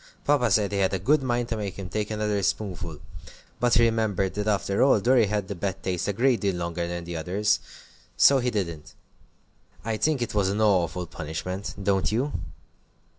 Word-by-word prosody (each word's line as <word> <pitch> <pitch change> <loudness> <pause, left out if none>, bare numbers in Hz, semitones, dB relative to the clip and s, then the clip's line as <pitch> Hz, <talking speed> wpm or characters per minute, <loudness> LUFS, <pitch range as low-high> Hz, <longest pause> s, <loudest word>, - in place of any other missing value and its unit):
Papa 140 -5 +3
said 105 -1 +2
he 100 - -1
had 95 0 +2
a - - +1
good 140 - +2
mind 120 -2 -1
to 115 - -1
make 100 -3 -4
him 95 -2 -5
take 105 +4 -3
another 105 -1 -1
spoonful, 90 -5 -2 0.6
but 120 -1 +3
he 120 - +5
remembered 110 -5 +1
that 105 +1 -3
after 100 -1 +1
all 135 -5 +5
Dorry 120 +1 +4
had 105 -1 -2
the 100 - -4
bad 95 +1 -4
taste 90 -1 -2
a 100 - 0
great 125 +3 +2
deal 100 -3 0
longer 85 0 -3
than 85 0 -4
the 85 0 -6
others, 100 +6 +1 0.6
so 140 -1 +6
he 125 0 0
didn't. 85 -9 -4 0.9
I 110 -1 -1
think 150 0 +1
it 120 - -5
was 100 -2 +2
an 100 +2 -1
awful 90 -4 +2
punishment, 85 +5 -5
don't 95 0 +1
you?" 130 +7 -1
100 Hz, 195 wpm, -26 LUFS, 90-115 Hz, 0.9 s, so